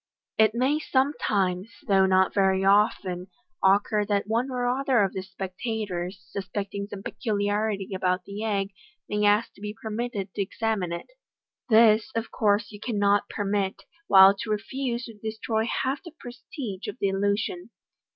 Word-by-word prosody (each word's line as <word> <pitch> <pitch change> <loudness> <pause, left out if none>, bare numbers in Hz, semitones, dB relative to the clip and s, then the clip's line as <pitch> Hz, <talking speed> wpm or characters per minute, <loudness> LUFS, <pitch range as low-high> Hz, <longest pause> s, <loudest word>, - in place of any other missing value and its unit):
It 220 0 +5
may 265 +5 +2
sometimes, 210 -10 0 0.2
though 195 -2 +4
not 190 0 +3
very 190 -1 +2
often, 195 -3 +2 0.4
occur 205 +2 +3
that 205 -1 +1
one 230 +5 0
or 250 -1 -2
other 255 -2 +2
of 195 - -1
the 190 - -3
spectators, 190 -1 -5
suspecting 200 +1 -4
some 200 -1 -8
peculiarity 205 -3 -1
about 185 0 0
the 205 +2 -6
egg, 200 -2 -1 0.4
may 210 0 -1
ask 205 +2 +3
to - - -19
be 210 +1 -6
permitted 220 -3 -4
to - - -2
examine 200 -2 -1
it. 170 - -6 0.6
This, 220 0 +5
of 225 0 -2
course, 210 +1 +1
you 205 - -10
cannot 205 -2 +1
permit, 200 -1 -2 0.2
while 195 0 +8
to 215 - -5
refuse 240 +3 -2
would 215 -3 -13
destroy 220 0 -2
half 265 +4 -1
the 340 -4 -11
prestige 240 -4 -7
of - - -5
the 200 - +1
illusion. 200 -1 -1
205 Hz, 150 wpm, -26 LUFS, 195-225 Hz, 0.6 s, while